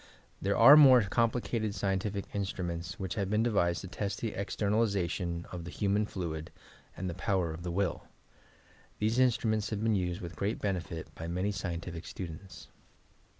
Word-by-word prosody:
There 100 +1 +1
are 130 +6 +10
more 130 -6 +8
complicated 115 0 0
scientific 100 0 -1
instruments 90 -3 -3
which 95 -3 -3
have 100 -3 -2
been 105 +2 +2
devised 90 -7 +1
to 95 - -7
test 100 +2 -4
the 115 - -2
extemalization 100 -4 -1
of 90 -2 -5
the 85 - -7
human 100 +3 0
fluid, 80 -5 -4 0.5
and 95 - -3
the 90 - -3
power 90 -3 0
of 80 - -8
the 90 - -4
will. 90 0 -1 0.9
These 110 +4 +1
in 130 0 +6
struments 110 -2 -1
have 105 -1 -3
been 110 -1 +3
used 90 -3 -1
with 85 -1 -7
great 105 +3 -1
beneflt 90 -5 -3
by 80 - -7
mauy 90 +4 -1
scientifle 85 -3 -4
students. 90 +2 -8
95 Hz, 165 wpm, -31 LUFS, 85-105 Hz, 0.9 s, are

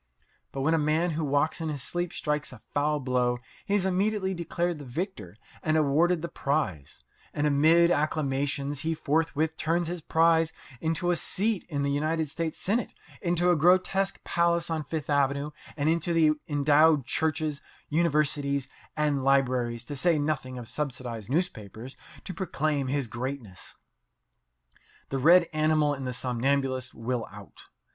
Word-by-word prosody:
But 135 - -4
when 155 +4 +2
a 165 - +3
man 155 +3 +1
who 160 +1 -2
walks 145 +3 +1
in 160 - -2
his 145 -3 -3
sleep 175 +3 -2
strikes 150 0 -2
a 125 -4 -13
foul 150 +1 +1
blow 125 -2 +1 0.3
he 200 - +2
is 195 -2 +1
immediately 190 +1 0
declared 170 -1 -2
the - - -8
victor 125 - -5 0.2
and 155 0 +1
awarded 160 +3 +2
the - - -1
prize; 95 - -2 0.3
and 145 - 0
amid 160 +4 +5
acclamations 145 -2 0
he 160 +2 -1
forthwith 160 +1 0
turns 170 +1 0
his 175 -1 -4
prize 165 0 +3 0.3
into 165 +4 0
a - - +2
seat 205 +4 0
in 140 -3 -1
the 140 - 0
United 155 +2 0
States 165 +1 -3
Senate, 220 +4 -1 0.3
into 175 -1 +2
a - - +4
grotesque 185 +4 +2
palace 170 0 +1
on 155 -2 -2
Fifth 155 -3 -4
Avenue, 140 0 +1 0.3
and 145 0 0
into 160 -2 +2
endowed 145 0 +4
churches, 155 -1 -1 0.3
universities 145 -4 +1 0.3
and 145 -3 +1
libraries, 125 -3 +1
to 145 +4 -7
say 165 +4 +3
nothing 145 -4 -2
of 120 -2 -7
subsidized 125 -6 -4
newspapers, 125 - -3 0.3
to 185 - -6
proclaim 155 -5 -1
his 140 0 0
greatness. 120 -4 -6 1.3
The 135 - -2
red 170 +5 +6
animal 155 -1 +2
in 135 -2 -5
the 125 - -3
somnambulist 130 +1 -1
will 115 +1 -3
out. - - -13
150 Hz, 150 wpm, -27 LUFS, 135-165 Hz, 1.3 s, red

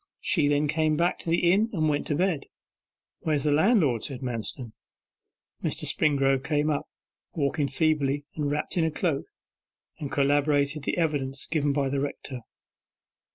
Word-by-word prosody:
She 155 -6 +3
then 145 +1 +2
came 155 0 +1
back 170 +2 +1
to - - -5
the 170 +1 +3
inn 215 +4 +2
and 155 -4 +1
went 145 -1 0
to 150 - 0
bed.' 175 -3 0 0.7
'Where's 150 -3 0
the 150 - +2
landlord?' 155 - +3
said 135 -3 -4
Manston. 120 -1 -4 0.9
Mr. - - -2
Springrove 135 -3 +2
came 150 +1 +1
up, 145 - -3 0.4
walking 140 -1 0
feebly, 145 -1 +1
and 150 -2 -2
wrapped 150 +5 -2
in 170 - +3
a 160 - +2
cloak, 155 -2 -1 0.7
and 145 -4 -5
corroborated 145 +1 +1
the - - -1
evidence 140 -5 0
given 145 -3 0
by 140 -1 0
the 135 +1 -1
rector. 140 -2 -4
145 Hz, 155 wpm, -27 LUFS, 140-155 Hz, 0.9 s, She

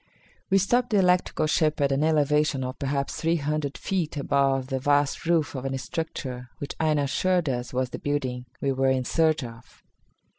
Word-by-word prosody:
We 195 - +4
stopped 240 +6 +2
the 210 - +2
electrical 180 -4 +2
ship 155 0 +1
at 140 -1 +2
an 135 +2 +1
elevation 150 -2 +2
of 130 +1 -5
perhaps 140 0 -1
three 165 +1 +2
hundred 150 -2 -2
feet 170 -6 -2
above 135 -2 +1
the 135 0 -2
vast 145 +3 +1
roof 165 -3 +2
of 130 -2 -5
a 135 0 -2
structure 130 -3 -5
which 145 - -5
Aina 155 -2 +2
assured 175 +4 +1
us 125 -2 -2
was 130 0 -1
the - - -5
building 130 -4 -2
we 140 - 0
were 135 0 +1
in 130 -1 +1
search 160 -1 +2
of. 115 -1 -12
145 Hz, 185 wpm, -26 LUFS, 135-160 Hz, -, We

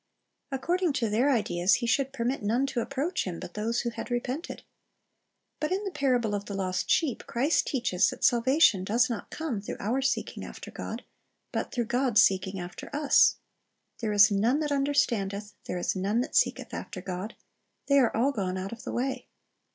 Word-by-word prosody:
According 340 +5 0
to 230 -5 -1
their 245 +7 +3
ideas 195 -7 +2
He 250 - -2
should 270 +3 +1
permit 255 0 -2
none 230 +6 +1
to 270 -3 -2
approach 275 +8 -2
Him 175 -3 -4
but 180 -1 -8
those 225 +3 -1
who 235 - -2
had 230 - -7
repented. 250 +6 -3 1.0
But 305 +2 -2
in 385 +3 0
the 395 - -3
parable 250 -8 +1
of 205 0 -2
the 200 - -5
lost 185 -1 -2
sheep, 300 -8 +1
Christ 275 +7 +1
teaches 235 -9 +2
that 255 - -8
salvation 240 - +4
does 235 +6 +2
not 230 - -5
come 295 -11 -3
through 205 - -6
our 240 +6 0
seeking 270 - -1
after - - -9
God, - - -6 0.5
but - - -3
through 240 -2 -1
God's 245 -2 +2
seeking 190 0 +1
after 175 0 -7
us. 295 -1 +5 0.6
"There 220 -3 -1
is 210 +1 +6
none 225 +8 +2
that 300 -1 -1
understandeth, 215 -8 0
there 180 - -3
is 175 - -1
none 200 +5 +1
that 260 - -5
seeketh - - +1
after 190 - -6
God. 185 +4 -5 0.5
They 280 0 +4
are 245 -4 +2
all 260 +5 +3
gone 190 -7 -2
out 190 +1 -4
of 230 0 -9
the - - -5
way." 260 +2 -2
235 Hz, 190 wpm, -28 LUFS, 200-270 Hz, 1.0 s, is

